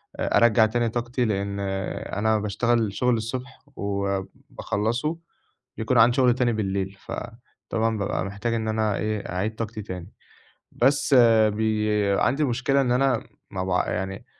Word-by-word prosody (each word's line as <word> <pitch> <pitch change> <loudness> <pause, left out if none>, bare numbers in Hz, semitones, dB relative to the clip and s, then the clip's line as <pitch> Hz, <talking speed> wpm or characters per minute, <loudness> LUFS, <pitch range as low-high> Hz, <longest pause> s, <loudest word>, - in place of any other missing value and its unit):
آآ - - +1
أرجّع 115 -1 +5
تاني 115 +1 0
طاقتي، 120 +2 -1
لأن 100 -2 -2 0.6
أنا 110 0 +2
باشتغل 110 +1 0
شغل 125 +4 +1
الصبح 125 +3 -5 0.2
وباخلّصه، 100 - -2 0.6
بيكون 110 +3 0
عندي 115 +1 +6
شغل 125 -2 +5
تاني 125 -2 +1
بالليل، 95 -2 -2
فطبعًا 115 -1 -4
بابقى 100 -2 -2
محتاج 100 +4 -3
إن 110 -1 -1
أنا 110 -2 0
إيه 105 -1 -1
أعيد 105 +5 -2
طاقتي 110 -1 -5
تاني. 90 -4 -8 0.6
بس 135 +3 +2 0.4
بي 110 0 0 0.3
عندي 150 +4 +2
مشكلة 130 +2 +1
إن 125 -2 +1
أنا 125 -2 +1 0.2
ما 95 -2 -3
باع 90 -1 0
يعني 95 +1 -4
110 Hz, 140 wpm, -25 LUFS, 100-120 Hz, 0.6 s, عندي